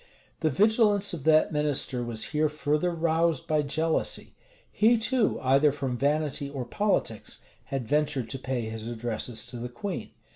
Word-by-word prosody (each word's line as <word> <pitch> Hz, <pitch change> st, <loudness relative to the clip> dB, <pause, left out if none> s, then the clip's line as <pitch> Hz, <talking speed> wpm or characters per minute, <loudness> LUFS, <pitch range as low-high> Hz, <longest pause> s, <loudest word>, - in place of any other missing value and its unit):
The 160 Hz, -, +1 dB
vigilance 205 Hz, -, +3 dB
of 155 Hz, -6 st, -6 dB
that 155 Hz, -1 st, +4 dB
minister 145 Hz, -4 st, +1 dB
was 115 Hz, -2 st, -1 dB
here 150 Hz, 0 st, +2 dB
further 150 Hz, +3 st, 0 dB
roused 165 Hz, 0 st, 0 dB
by 155 Hz, -2 st, +2 dB
jealousy. 160 Hz, +3 st, -1 dB, 0.4 s
He, 230 Hz, +3 st, +4 dB
too, 230 Hz, 0 st, +1 dB
either 135 Hz, +3 st, +4 dB
from 135 Hz, -3 st, -3 dB
vanity 145 Hz, +1 st, 0 dB
or 135 Hz, -3 st, -5 dB
politics, 120 Hz, -, -1 dB, 0.2 s
had 135 Hz, -4 st, -4 dB
ventured 145 Hz, -3 st, 0 dB
to 135 Hz, -, -4 dB
pay 130 Hz, -1 st, -2 dB
his 110 Hz, 0 st, -5 dB
addresses 115 Hz, -1 st, -1 dB
to 125 Hz, -, -7 dB
the 120 Hz, +1 st, -5 dB
queen. 180 Hz, +10 st, -5 dB
150 Hz, 155 wpm, -27 LUFS, 125-165 Hz, 0.4 s, that